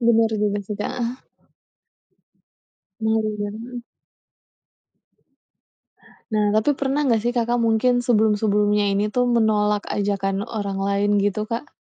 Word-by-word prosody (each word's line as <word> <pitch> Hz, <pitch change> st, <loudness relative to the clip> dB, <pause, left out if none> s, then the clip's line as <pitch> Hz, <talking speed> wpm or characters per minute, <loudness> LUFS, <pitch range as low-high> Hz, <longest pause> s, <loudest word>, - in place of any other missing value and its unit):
Bener 230 Hz, -1 st, +3 dB
juga 205 Hz, -1 st, 0 dB
sih, 210 Hz, 0 st, -5 dB
Kak, -, -, -2 dB
heeh. 245 Hz, +1 st, -4 dB, 1.8 s
Mari 220 Hz, -1 st, +1 dB
dan 205 Hz, 0 st, -3 dB
heeh. 245 Hz, 0 st, -8 dB, 2.5 s
Nah, 210 Hz, -1 st, +1 dB
tapi 265 Hz, +6 st, +2 dB
pernah 280 Hz, +2 st, 0 dB
nggak 230 Hz, -2 st, +3 dB
sih 240 Hz, -, +1 dB
Kakak 240 Hz, 0 st, +1 dB
mungkin 235 Hz, +2 st, +2 dB
sebelum-sebelumnya 210 Hz, -3 st, +2 dB
ini 210 Hz, +1 st, 0 dB
tuh 250 Hz, +3 st, +1 dB
menolak 210 Hz, -3 st, +1 dB
ajakan 200 Hz, 0 st, -1 dB
orang 200 Hz, -4 st, -4 dB
lain 200 Hz, +1 st, 0 dB
gitu, 205 Hz, +1 st, 0 dB
Kak? 235 Hz, +5 st, -5 dB
215 Hz, 120 wpm, -22 LUFS, 205-235 Hz, 2.5 s, Bener